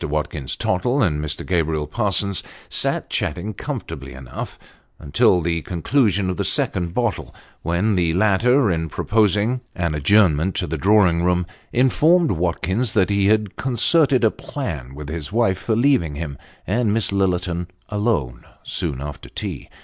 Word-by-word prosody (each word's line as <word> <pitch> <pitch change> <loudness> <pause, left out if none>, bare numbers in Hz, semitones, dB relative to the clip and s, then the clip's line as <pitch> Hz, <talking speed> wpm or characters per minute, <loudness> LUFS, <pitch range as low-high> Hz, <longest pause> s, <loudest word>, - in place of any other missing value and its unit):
Watkins 75 -2 -3
Tottle 120 +9 +1
and 75 -6 0
Mr. 75 0 -4
Gabriel 80 -4 0
Parsons 100 +2 0 0.3
sat - - -1
chatting 105 +1 -2
comfortably 65 - -6
enough, 65 -1 -7 0.4
until 85 +5 +2
the 85 0 -1
conclusion 95 - +1
of 90 -2 -2
the - - 0
second 85 -1 -1
bottle, 120 -5 -2 0.3
when 85 +6 +1
the 85 -3 +2
latter, 110 +5 +3
in 80 -1 -2
proposing 105 - +1
an 85 -3 -1
adjournment 85 +2 +3
to - - -1
the 80 -1 -3
drawing 95 -1 +3
room, 90 0 +2 0.3
informed 155 +7 +3
Watkins 90 +6 0
that 95 -2 +2
he 100 -1 +2
had 105 -2 +1
concerted 130 +2 +3
a 110 - +5
plan 80 - -6
with 75 0 -8
his 80 0 -5
wife, 105 -5 +1
for 110 +3 -1
leaving 115 - +2
him 75 -2 -5 0.3
and 110 +2 +1
Miss 110 -1 +1
Lillerton 90 -3 0 0.2
alone, 100 - -1 0.2
soon 65 -2 -3
after 75 0 -7
tea. - - -6
95 Hz, 150 wpm, -21 LUFS, 80-110 Hz, 0.4 s, a